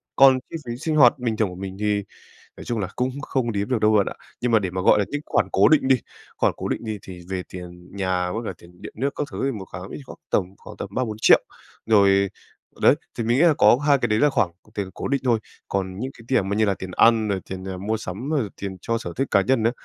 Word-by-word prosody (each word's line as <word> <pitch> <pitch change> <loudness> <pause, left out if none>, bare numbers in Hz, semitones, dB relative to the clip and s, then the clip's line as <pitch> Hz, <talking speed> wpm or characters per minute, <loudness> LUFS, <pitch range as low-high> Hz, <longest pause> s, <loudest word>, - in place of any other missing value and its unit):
Còn 135 -1 +7
chi - - -7
phí 120 0 -5
sinh 155 +3 -2
hoạt 135 -1 +6
bình 115 -3 -1
thường 110 -4 +1
của 90 - -9
mình 95 +1 -7
thì 105 -1 0 0.5
nói - - -9
chung 120 -2 -2
là 95 -3 -2
cũng 125 +1 0
không 125 -5 -1
đếm 100 +3 -2
được 125 -3 +1
đâu 110 0 +4
bạn 100 -2 +4
ạ. - - -4 0.3
Nhưng 125 -1 0
mà 110 - +6
để 95 -4 -3
mà 95 - -3
gọi 105 - +5
là 100 - +2
những 145 - -3
khoản - - +1
cố - - +5
định 145 -4 +4
đi, 130 - +6 0.4
khoản - - +2
cố - - -4
định - - -3
đi 110 -2 -4
thì 90 -2 -10
về 95 -1 -3
tiền 90 +1 -10
nhà 90 -2 -1
với 115 +2 -3
cả - - -3
tiền 90 +1 -18
điện - - -8
nước 135 +5 0
các 145 - -2
thứ - - -6
thì 135 - +1
1 95 - -7
kháng 90 +2 -7
ví 145 - -7
khoảng - - -11
tầm 100 - +2
khoảng - - -12
tầm - - -5
3.000.000-4.000.000. 110 -4 +4 0.5
Rồi, 100 -2 +4 0.5
đấy, - - +6 0.2
thì 115 - -1
mình 120 +2 +2
nghĩ 155 - +4
là 170 -3 +6
có - - +6
hai 140 -1 +5
cái 120 -3 0
đấy 105 0 +2
là 150 +2 +4
khoảng 95 -8 +1 0.2
c - - -31
tiền 100 -2 -3
cố - - -4
định 140 -1 +1
thôi, 120 -3 +3 0.3
còn 95 -1 -2
những 130 +4 -3
cái 115 - -14
tiền 100 -7 +2
mà 100 - -1
như 110 - +3
là 100 -2 +2
tiền 95 0 -8
ăn 115 -2 +5
rồi 95 -2 -1
tiền, 95 0 -5
à, 95 - -4
mua 105 +4 -2
sắm, 110 - -6
rồi 135 -9 0
tiền 95 -1 -5
cho 115 +3 -1
sở - - -6
thích 135 0 -1
cá 100 -2 +4
nhân 125 -2 +1
á 115 - +4
110 Hz, 285 wpm, -23 LUFS, 95-125 Hz, 0.5 s, Còn